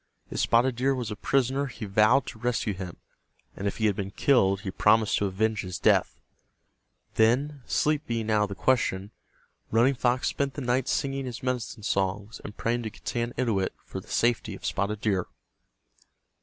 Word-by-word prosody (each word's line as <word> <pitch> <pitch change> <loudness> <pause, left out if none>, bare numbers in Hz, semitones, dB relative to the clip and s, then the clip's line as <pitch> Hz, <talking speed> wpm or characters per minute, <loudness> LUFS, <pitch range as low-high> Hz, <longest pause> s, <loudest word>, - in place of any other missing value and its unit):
If - - -3
Spotted 120 +1 +3
Deer 135 +2 +2
was 120 -4 -4
a - - -3
prisoner 135 +4 +1
he 120 -3 -7
vowed 110 +6 +4
to 110 - -9
rescue 120 -3 0
him, 90 -2 -7 0.6
and 100 - -3
if - - -3
he 110 - 0
had 105 -2 +2
been 100 -1 -3
killed 100 -4 +3
he 95 - -4
promised 110 +2 +3
to 100 - +1
avenge 110 +2 0
his 90 -1 -5
death. - - +2 1.0
Then, 135 +6 +2
sleep 150 0 +1
being 115 -2 -1
out 105 -1 +3
of 105 - +1
the 100 - -5
question, 105 -5 +1 0.6
Running 120 +5 +4
Fox 125 0 +1
spent 140 -1 -1
the 145 - -4
night 125 0 0
singing 135 -2 -1
his 125 +2 -7
medicine 125 -4 -3
songs 100 +2 -1
and 105 - -9
praying 120 +1 0
to 110 - -4
Getanittowit 115 -1 -2
for - - -6
the - - -15
safety 115 -3 0
of - - -10
Spotted 100 +1 -1
Deer. 95 -4 0
115 Hz, 180 wpm, -27 LUFS, 100-125 Hz, 1.0 s, vowed